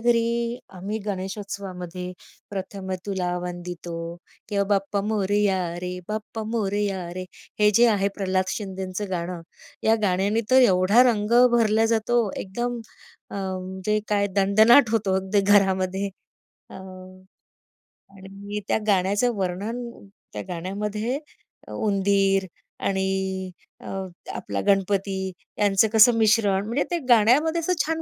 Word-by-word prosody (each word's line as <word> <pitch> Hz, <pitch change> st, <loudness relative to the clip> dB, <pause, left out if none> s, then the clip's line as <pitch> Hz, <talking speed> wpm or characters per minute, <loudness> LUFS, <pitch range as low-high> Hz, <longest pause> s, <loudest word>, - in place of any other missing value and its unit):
घरी 230 Hz, 0 st, +3 dB, 0.5 s
आम्ही 205 Hz, +4 st, -3 dB
गणेशोत्सवामध्ये 190 Hz, -2 st, -5 dB, 0.4 s
प्रथम 190 Hz, -1 st, -5 dB
तुला 190 Hz, -3 st, -1 dB, 0.2 s
वंदितो 175 Hz, -1 st, -6 dB, 0.5 s
किंवा 200 Hz, -1 st, +1 dB
बाप्पा 200 Hz, 0 st, 0 dB
मोरिया 205 Hz, -2 st, +1 dB, 0.3 s
रे 180 Hz, -, -3 dB, 0.2 s
बाप्पा 220 Hz, +1 st, -4 dB
मोरिया 200 Hz, -3 st, -1 dB
रे. 185 Hz, -, -4 dB, 0.4 s
हे 210 Hz, -, +6 dB
जे 240 Hz, -, +7 dB
आहे 200 Hz, 0 st, +1 dB
प्रल्हाद 185 Hz, -1 st, +1 dB
शिंदेचं 190 Hz, -1 st, -5 dB
गाणं. 175 Hz, -1 st, -3 dB, 0.5 s
या 225 Hz, -, +6 dB
गाण्याने 195 Hz, +4 st, +1 dB
तर 260 Hz, 0 st, +7 dB
एवढा 185 Hz, +6 st, +5 dB
रंग 210 Hz, 0 st, -2 dB, 0.2 s
भरला 220 Hz, -1 st, +3 dB
जातो. 225 Hz, +2 st, +1 dB, 0.3 s
एकदम 240 Hz, +5 st, -3 dB, 0.5 s
अ, -, -, -8 dB
म्हणजे 190 Hz, +1 st, -2 dB
काय 205 Hz, -1 st, +2 dB
दणदणाट 220 Hz, +6 st, +6 dB
होतो 215 Hz, -4 st, +1 dB
अगदी 190 Hz, +2 st, +1 dB
घरामध्ये. 190 Hz, 0 st, +2 dB, 0.6 s
अ, -, -, -11 dB
आणि 185 Hz, 0 st, -13 dB, 1.0 s
मी 205 Hz, +1 st, -3 dB
त्या -, -, +2 dB
गाण्याचं 205 Hz, +5 st, +2 dB
वर्णन 195 Hz, +6 st, -2 dB, 0.5 s
त्या -, -, -4 dB
गाण्यामध्ये 210 Hz, +8 st, -3 dB, 0.6 s
उंदीर 195 Hz, -1 st, +2 dB, 0.4 s
आणि 190 Hz, -1 st, 0 dB, 0.7 s
अ, -, -, -11 dB, 0.5 s
आपला -, -, -4 dB
गणपती 195 Hz, 0 st, +2 dB, 0.4 s
यांचं 205 Hz, +1 st, +4 dB
कसं 225 Hz, +2 st, +7 dB
मिश्रण 210 Hz, -3 st, +3 dB
म्हणजे 245 Hz, +6 st, 0 dB
ते 345 Hz, -, 0 dB
गाण्यामध्ये 260 Hz, +9 st, +4 dB
असं 360 Hz, +3 st, +1 dB
छान 325 Hz, +1 st, -2 dB
200 Hz, 120 wpm, -24 LUFS, 190-220 Hz, 1.0 s, जे